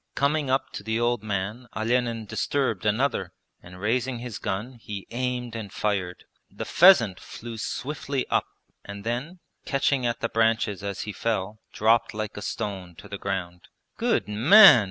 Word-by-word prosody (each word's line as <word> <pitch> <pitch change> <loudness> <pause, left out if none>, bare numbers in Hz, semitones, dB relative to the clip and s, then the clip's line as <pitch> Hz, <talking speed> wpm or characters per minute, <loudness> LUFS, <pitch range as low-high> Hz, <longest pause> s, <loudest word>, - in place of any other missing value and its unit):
Coming 145 0 +1
up 135 +1 0
to - - -6
the 110 +2 -1
old 120 -1 +1
man 105 +4 -3
Olenin 115 0 0
disturbed 115 -3 -1
another, 105 -5 0 0.3
and 90 +1 -13
raising 125 +5 0
his 120 -4 -6
gun 105 +7 -3
he 100 -3 -7
aimed 125 -1 -3
and 110 -4 -6
fired. 95 -5 -2 0.3
The - - -6
pheasant 125 - +6
flew 115 -1 -9
swiftly 140 +2 -3
up - - +1 0.4
and 100 0 -8
then, 130 - -4 0.2
catching 135 -2 +1
at 120 - -2
the 115 - -1
branches 110 -3 +1
as 100 -1 -4
he 105 - -5
fell, 110 -1 -2
dropped 110 0 +2
like 110 -1 -4
a 105 - -6
stone 95 -4 -4
to 100 - -12
the 100 0 -7
ground. 90 -3 -4 0.3
'Good - - +1
man!' 145 - +8
115 Hz, 160 wpm, -26 LUFS, 100-125 Hz, 0.4 s, man